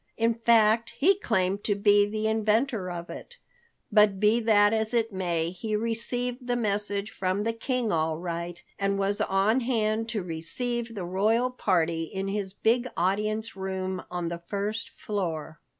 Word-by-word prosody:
In 230 0 +2
fact, 230 -1 +3
he 380 +6 +4
claimed 195 - 0
to 205 - +2
be 205 0 +4
the 215 +1 -3
inventor 220 -1 +1
of 175 -1 -6
it. 485 - -10 0.5
But 210 -3 +4
be 215 +3 +4
that 210 -2 +4
as 220 +1 0
it 225 -2 +1
may, 170 -3 -1
he 215 +4 -3
received 245 +3 -2
the 245 - +1
message 205 -2 -1
from 185 +2 -1
the 230 +1 0
King 240 -1 -1
all 160 -1 0
right, 170 0 -5 0.2
and 195 0 +1
was 200 +1 0
on 195 +6 +2
hand 225 -2 0
to 210 -5 -2
receive 230 +8 -3
the 190 -4 -4
royal 220 +7 +1
party 165 -8 +1
in 190 +4 -4
his 200 -1 -2
big 235 +5 +1
audience 210 +5 0
room 190 -1 -3
on 175 -1 -3
the 170 0 -5
first 210 +2 -2
floor. 165 -7 -4
210 Hz, 165 wpm, -27 LUFS, 185-230 Hz, 0.5 s, he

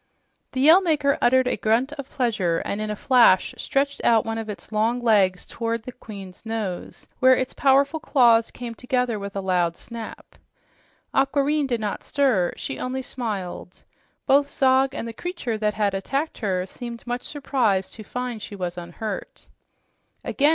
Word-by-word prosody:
The 260 - -1
Yell 320 +7 +7
Maker 295 -6 +1
uttered 260 +1 +4
a 250 - +1
grunt 235 +6 +1
of 280 -3 -8
pleasure 215 -10 0
and 205 - -2
in 215 - -3
a 210 - -2
flash 235 -5 +4
stretched 280 +1 -1
out 225 -2 +4
one 225 0 -2
of 220 -1 -6
its 210 +1 -8
long 220 +3 +1
legs 200 -6 +3
toward 230 -1 -3
the 255 - -7
queen's 200 -6 -11
nose, 220 -5 -4
where 260 0 +6
its 255 0 -2
powerful 280 +3 +3
claws 235 -7 +4
came 240 -2 -7
together 250 -2 -1
with 200 0 -7
a 195 - -1
loud 180 -3 +1
noise. 230 -1 -6 1.0
Aquareine 280 +2 +2
did 240 -3 -1
not 210 -2 -3
stir; 255 -11 +2
she 275 - -5
only 260 +1 -3
smiled. 200 -8 -5 0.4
Both 280 +1 +4
Zog 265 0 +3
and 230 - -4
the 230 - -6
creature 255 - -4
that 210 -1 0
had 205 -2 +1
attacked 275 +11 -2
her 185 -5 -1
seemed 235 +4 -8
much 245 0 -3
surprised 245 -11 0
to 220 - -9
find 245 0 -4
she 205 - -7
was 180 -2 -4
unhurt. 185 +5 -6 0.8
"Again!" 290 +1 +2
235 Hz, 170 wpm, -24 LUFS, 210-265 Hz, 1.0 s, Yell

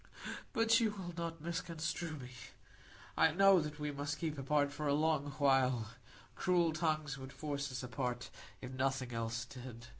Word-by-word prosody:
But 225 +1 +4
you 225 -2 +3
will 175 -2 -5
not 165 -2 -4
misconstrue 165 -1 -2
me. 125 -2 -9 0.8
I - - +6
know 195 +3 +6
that 150 0 -5
we 150 0 -1
must 145 +1 -3
keep 155 -3 -2
apart 145 +1 +2
for 150 +1 -3
a 140 - +3
long 150 -2 +2
while; 130 -5 +3 0.4
cruel 175 -3 +2
tongues 155 -4 0
would 130 0 -8
force 145 -2 -3
us 130 +1 -4
apart, 125 -1 -3 0.3
if 130 - -6
nothing 130 -1 0
else 115 0 -2
did. 120 -2 -9
145 Hz, 160 wpm, -36 LUFS, 130-165 Hz, 0.8 s, I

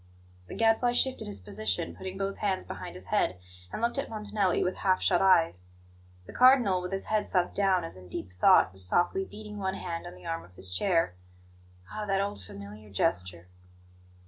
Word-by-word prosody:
The - - -8
Gadfly 225 +2 +3
shifted 260 +1 +2
his 100 -2 -4
position, 95 -3 -2
putting 185 - -7
both 195 0 -3
hands 195 -3 -1
behind - - -8
his 90 +1 -7
head, 90 - +2 0.3
and 225 - -5
looked 240 +4 +1
at 275 - -3
Montanelli 210 -3 0
with 180 - -1
half 185 -1 +2
shut 180 -2 +2
eyes. 165 - +3 0.6
The - - -11
Cardinal, 245 -8 +5
with 180 +1 -5
his 195 0 -2
head 215 -1 0
sunk 180 -2 +1
down 190 -3 +2
as 165 - -6
in 90 -1 -13
deep 90 +1 -6
thought, 90 +1 +5
was 95 0 +3
softly 175 - +2
beating 210 - -9
one 190 -1 -2
hand 175 -2 -5
on 175 - -9
the - - -15
arm 165 0 -3
of 90 +1 -18
his 90 0 -6
chair. 165 - +2 0.8
Ah, 210 -1 -5
that 195 -1 +1
old, 200 - -2
familiar 100 +2 -10
gesture! 90 -2 -1
180 Hz, 195 wpm, -29 LUFS, -, 0.8 s, Cardinal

